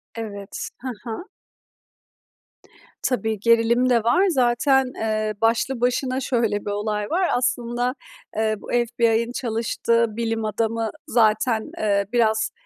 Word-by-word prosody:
Evet, 205 -3 -6
ha 260 - -6
ha. 240 - -6 1.8
Tabii, 225 -5 0
gerilim 230 +3 +3
de 235 -3 +3
var 245 - +4
zaten, 265 -1 +3
eee, 215 -1 -1
başlı 230 +2 +1
başına 255 +1 +1
şöyle 230 -5 0
bir 205 - -2
olay 210 0 -2
var 360 +2 +1
aslında, 245 0 0 0.4
eee, 220 0 +1
bu - - -11
FBI'ın 235 -1 +1
çalıştığı 230 -1 0
bilim 225 0 -2
adamı 225 +1 -1 0.2
zaten, 220 0 +2
eee, 200 -2 +1
biraz, 220 -2 +2
230 Hz, 120 wpm, -23 LUFS, 220-245 Hz, 1.8 s, var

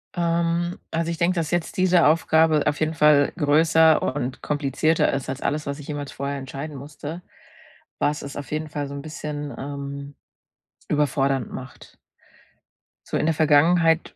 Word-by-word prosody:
Ähm, 170 0 0
also, 165 0 -1
ich 165 - -4
denke, 175 +3 +1
dass 165 -3 -2
jetzt 175 -2 -2
diese 180 -3 +4
Aufgabe 160 -1 +3
auf 150 - 0
jeden 155 +1 0
Fall 150 -2 +4
größer 160 +1 +4
und 130 -2 -3
komplizierter 150 +2 +1
ist 135 -1 -3
als 135 +1 -4
alles, 150 +1 -1
was 140 +1 -4
ich 145 - -10
jemals 145 -2 -5
vorher 140 +1 -3
entscheiden 140 +2 -7
musste, 150 +4 -8 0.8
was 150 0 0
es 140 - -8
auf 145 -2 -7
jeden 155 0 -3
Fall 145 -1 -4
so 140 - -8
'n 140 - -5
bisschen, 150 -1 -6
ähm, 140 0 -6 0.7
überfordernd 135 -3 0
macht. 130 0 -10 1.1
So - - -1
in - - 0
der 165 - +2
Vergangenheit, 160 +2 +3
150 Hz, 160 wpm, -23 LUFS, 140-160 Hz, 1.1 s, diese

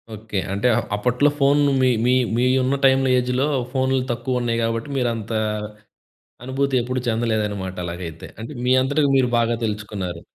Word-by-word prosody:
Okay. 105 -1 -6 0.2
అంటే 100 +5 0
up 120 - -1
అప్పట్లో 125 +7 +2
phone 140 +1 +4 0.2
మీ 130 - +4 0.2
మీ 125 - +4 0.2
మీ 125 - +2 0.2
ఉన్న 130 +2 +1
టైమ్‌లో 135 0 +4
ఏజ్‌లో 125 +2 0 0.3
ఫోన్‌లు 130 0 +1
తక్కువున్నాయి 120 -1 -1
కాబట్టి, 115 +3 -2
మీరంత 115 -4 -2 1.1
అనుభూతి 135 +1 0
ఎప్పుడు 130 +2 -2
చెందలేదనమాట 105 -5 -1
అలాగైతే. 85 -2 -7 0.2
అంటే, 115 - -7
మీ 125 - +2
అంతటికి 145 +2 +1
మీరు 130 -1 +3
బాగా 115 0 +1
తెలుసకున్నారు. 105 -5 -4
120 Hz, 145 wpm, -22 LUFS, 105-130 Hz, 1.1 s, phone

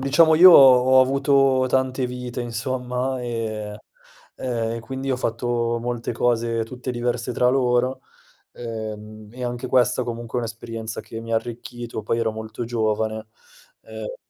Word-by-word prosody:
diciamo 155 +4 +4
io 185 +3 +9
ho 130 -3 +7
avuto 135 0 +3
tante 130 0 0
vite 125 0 -5
insomma, 125 +2 -3
e 110 -3 -4 0.6
ehm, 115 -3 -3
e 115 - -5
quindi 135 +3 -5
ho 130 - +1
fatto 120 -1 -1
molte 120 -1 -3
cose 115 -1 0
tutte 125 +2 -6
diverse 120 0 -2
tra 125 +1 +2
loro, 125 0 +1 0.5
uhm, 110 -2 -7
e 125 0 -9
anche 120 +1 -4
questa 125 0 +2
comunque 120 0 -4
è - - 0
un'esperienza 115 -1 -6
che 115 - -8
mi 115 0 -6
ha - - +3
arricchito, 120 0 -6
poi 115 +2 -1
ero 110 -1 0
molto 110 +2 -6
giovane, 110 -1 -2 0.5
eh - - -8
120 Hz, 145 wpm, -22 LUFS, 115-130 Hz, 0.6 s, io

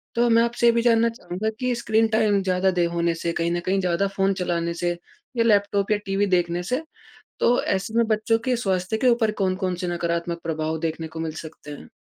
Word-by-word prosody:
तो 240 +1 +3
मैं 230 0 +5
आपसे 235 0 0
ये - - +7
भी 235 - +2
जानना 230 -1 +4
चाहूँगा 220 -2 -4
कि 250 -1 0
स्क्रीन 225 -1 +2
टाइम 215 -2 +2
ज़्यादा 185 0 +2
देर 175 -2 +1
होने 170 0 0
से, 170 0 -2
कहीं 170 0 -1
न 175 - 0
कहीं 195 +1 +1
ज़्यादा 185 +1 +1
फ़ोन 195 0 +2
चलाने 170 -2 -2
से, 175 0 -2 0.4
या 230 - +4
लैपटॉप 205 -2 +2
या 210 - +4
टीवी 195 +1 +1
देखने 175 -1 +1
से, 250 - -1 0.6
तो 245 +1 +3
ऐसे 195 +3 -1
में 235 - +4
बच्चों 220 +1 +2
के 255 -1 +2
स्वास्थ्य 190 -2 -1
के 255 - +1
ऊपर 235 -2 +2
कौन-कौन 185 -1 0
से 180 +1 -4
नकारात्मक 170 0 -2
प्रभाव 160 -1 -2
देखने 160 0 -3
को 160 +1 -9
मिल 160 -1 -2
सकते 150 -1 -11
हैं? 145 - -10
190 Hz, 220 wpm, -24 LUFS, 170-225 Hz, 0.6 s, ये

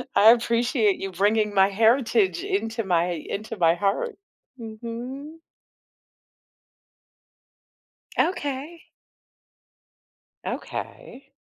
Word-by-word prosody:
I 220 +2 +8
appreciate 235 -2 +2
you 195 -1 -4
bringing 210 +3 +1
my 195 0 +5
heritage 240 - +2
into 230 - -2
my 175 -1 +1
into 215 +7 -5
my 165 -2 +4
heart. 205 - -1 0.4
Mhm. 240 +7 -7 2.8
Okay. 295 0 -2 1.6
Okay. 275 - -7
230 Hz, 75 wpm, -24 LUFS, 200-275 Hz, 2.8 s, I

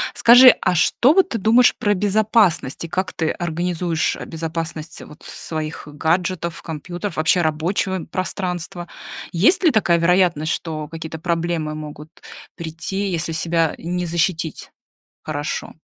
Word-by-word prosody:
Скажи, 245 +2 +8
а 185 - +1
что 240 - +3
вот 380 +1 +3
ты 230 - -2
думаешь 230 +4 +4
про 205 - +1
безопасность? 205 - +1
И - - -6
как 185 +3 -3
ты 160 -1 -1
организуешь 175 -1 -1
безопасность 165 -1 -5
вот 150 - -14
своих 155 -2 -6
гаджетов, 170 +3 -1
компьютеров, 175 +4 -6
вообще 160 +3 +3
рабочего, 170 +5 -1
м, 175 - -8
пространства? 180 0 -4 0.4
Есть 235 - +3
ли 335 - +6
такая 185 -8 +2
вероятность, 170 -3 +2
что 155 -2 -5
какие-то 160 0 -7
проблемы 165 -2 -2
могут 150 0 -9 0.5
прийти, 170 +4 -4
если 170 -1 -2
себя 165 -1 0
не 180 +1 -3
защитить 165 -1 -2 0.5
хорошо? 150 -1 -4
170 Hz, 130 wpm, -20 LUFS, 160-185 Hz, 0.5 s, Скажи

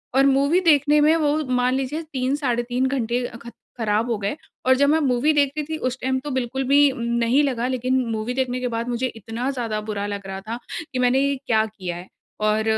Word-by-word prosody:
और 270 +1 +5
मूवी 280 +6 +3
देखने 295 -3 +4
में 310 +2 +5
वो 300 -1 +1 0.2
मान 250 +1 +2
लीजिए 270 +4 -2
3 260 +1 0
साढ़े 245 -5 0
3 250 +2 -1
घंटे 245 -2 -1
अ, 235 - -7
खत 235 0 -11 0.2
ख़राब 220 +1 0
हो 220 - 0
गए 200 +7 -2 0.3
और 260 0 +5
जब 280 +1 +4
मैं 320 +1 +4
मूवी 275 +2 +2
देखती 290 +1 +1
थी 315 +1 -4
उस 255 -1 -2
टाइम 260 0 0
तो 290 +2 -6
बिल्कुल 260 +1 -2
भी 285 +1 +6
उम, 260 - -8
नहीं 235 +4 +2
लगा 250 -3 0
लेकिन 255 0 0
मूवी 220 +3 -2
देखने 255 -1 -1
के 250 - -2
बाद 230 0 -3
मुझे 245 +2 -1
इतना 225 +4 -4
ज़्यादा 230 -5 -3
बुरा 210 -1 -4
लग 200 -1 -5
रहा 190 0 -5
था, 225 +4 -5 0.4
कि 255 - -1
मैंने 250 +1 +3
ये 280 0 +1
क्या 220 -1 +2
किया 190 -5 -6
है? 180 +2 -10 0.3
और 215 +1 +1
255 Hz, 230 wpm, -23 LUFS, 230-275 Hz, 0.4 s, भी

